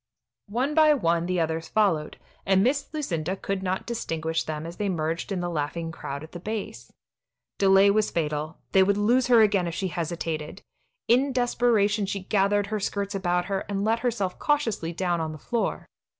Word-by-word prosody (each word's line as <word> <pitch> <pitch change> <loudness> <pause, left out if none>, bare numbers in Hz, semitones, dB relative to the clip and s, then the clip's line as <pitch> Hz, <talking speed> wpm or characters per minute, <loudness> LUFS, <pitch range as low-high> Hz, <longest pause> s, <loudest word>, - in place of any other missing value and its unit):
One 255 +7 0
by 305 -1 +6
one 170 -7 +1
the 180 -1 0
others 160 0 -1
followed, 180 -8 +1 0.3
and 190 0 +3
Miss 280 +3 0
Lucinda 185 - -2
could 195 0 -3
not 185 0 -2
distinguish 165 -8 -2
them 155 0 -5
as 170 +1 -8
they 205 -1 -1
merged 165 +1 -2
in 185 -2 -1
the 175 - -2
laughing 165 +1 -3
crowd 140 -3 -6
at 160 - -11
the 175 - -7
base. 185 - -6 0.7
Delay 195 0 +6
was 215 +1 +2
fatal; 155 0 -2
they 190 - +5
would 200 +1 +3
lose 240 +5 +3
her 235 -3 +6
again 200 -4 +2
if 170 - -4
she 190 - -2
hesitated. 165 0 -4 0.4
In 260 +4 +3
desperation 230 -5 +2
she 195 0 -3
gathered 200 +1 +2
her 215 +1 -3
skirts 200 0 -2
about 180 -2 0
her, 195 0 -1
and 200 -1 -1
let 225 +1 +2
herself 230 -7 -2
cautiously 230 - 0
down 175 -1 -1
on 160 -1 -3
the - - -8
floor. 230 - -2
195 Hz, 185 wpm, -26 LUFS, 165-215 Hz, 0.7 s, by